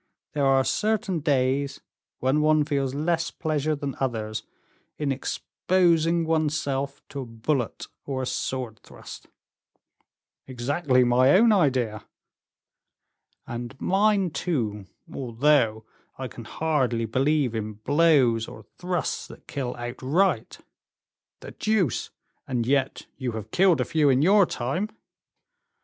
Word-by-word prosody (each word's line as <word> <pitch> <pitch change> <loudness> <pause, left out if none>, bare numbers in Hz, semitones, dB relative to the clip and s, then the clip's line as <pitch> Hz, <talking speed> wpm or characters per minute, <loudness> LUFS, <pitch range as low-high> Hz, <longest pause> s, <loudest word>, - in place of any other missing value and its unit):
There 145 -2 +1
are 135 0 +4
certain 205 - 0
days 140 -1 0 0.4
when 135 +4 +1
one 155 0 +3
feels 140 -3 -1
less 165 +2 0
pleasure 155 -1 -1
than 140 -2 -4
others 110 -5 -2 0.6
in 145 -2 -1
exposing 170 +4 +1
one's 155 -1 +1
self 140 0 -3
to 140 - -6
a 130 - -4
bullet 115 +2 -2 0.2
or 130 -2 -3
a - - -2
sword 125 -3 -3
thrust." - - -12 1.2
"Exactly 130 +1 +1
my 125 +2 +4
own 225 +4 +6
idea." 130 - +1 1.4
"And 120 +2 -7
mine, 195 -2 +2
too, 120 - -2 0.3
although 120 -3 +1 0.3
I 130 - -4
can 120 -2 -10
hardly 130 -6 0
believe 135 +2 +1
in 110 -1 -3
blows 130 -1 +3
or 110 - -11 0.2
thrusts 180 -2 -2
that - - -14
kill 130 -3 -4
outright." 130 +10 0 0.8
"The - - -9
deuce! 210 - 0 0.4
and 120 -3 -1
yet 135 +1 0
you 125 -3 -3
have 110 -1 -7
killed 180 -5 +4
a 125 - +1
few 155 -3 +2
in 130 +1 +3
your 195 +1 +5
time." 140 - -2
140 Hz, 125 wpm, -25 LUFS, 125-160 Hz, 1.4 s, own